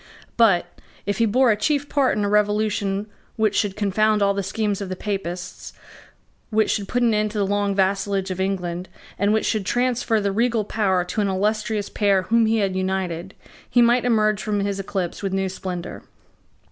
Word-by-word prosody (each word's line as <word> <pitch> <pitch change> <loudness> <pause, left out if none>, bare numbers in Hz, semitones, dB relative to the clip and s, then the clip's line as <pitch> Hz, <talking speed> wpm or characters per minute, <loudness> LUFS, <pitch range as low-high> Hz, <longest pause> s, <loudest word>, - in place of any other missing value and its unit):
But, 210 -7 +4 0.4
if 205 0 -2
he 230 - +4
bore 250 +3 +4
a - - +3
chief 285 +6 0
part 275 -6 +1
in 205 - 0
a - - 0
revolution 210 -1 +1 0.3
which 215 -2 +1
should 200 -2 0
confound 210 +1 +2
all 200 0 +3
the 200 - -1
schemes 205 +1 -2
of 195 - -4
the 185 - -3
Papists, 185 -3 -5 0.8
which 220 -1 +2
should 200 -2 -2
put 245 +2 0
an 230 -2 +3
end 210 0 +1
to 215 - -6
the 200 - +2
long 200 0 0
vassalage 195 0 0
of 185 0 -3
England, 180 -2 -3 0.3
and 200 +2 +2
which 220 0 +1
should 215 -2 0
transfer 245 0 +1
the 200 -1 0
regal 230 +1 +1
power 190 -4 +1
to 185 +4 -2
an 205 - +1
illustrious 210 +2 -1
pair 200 -3 +1
whom 230 +3 +3
he 225 +1 +2
had 195 -3 0
united, 185 -1 -2 0.3
he 245 - +4
might 240 +1 +3
emerge 215 -4 +2
from 205 0 -1
his 200 0 -2
eclipse 190 -2 -3
with 195 -2 -2
new 195 0 0
splendour. 180 -2 -6
205 Hz, 195 wpm, -22 LUFS, 190-220 Hz, 0.8 s, But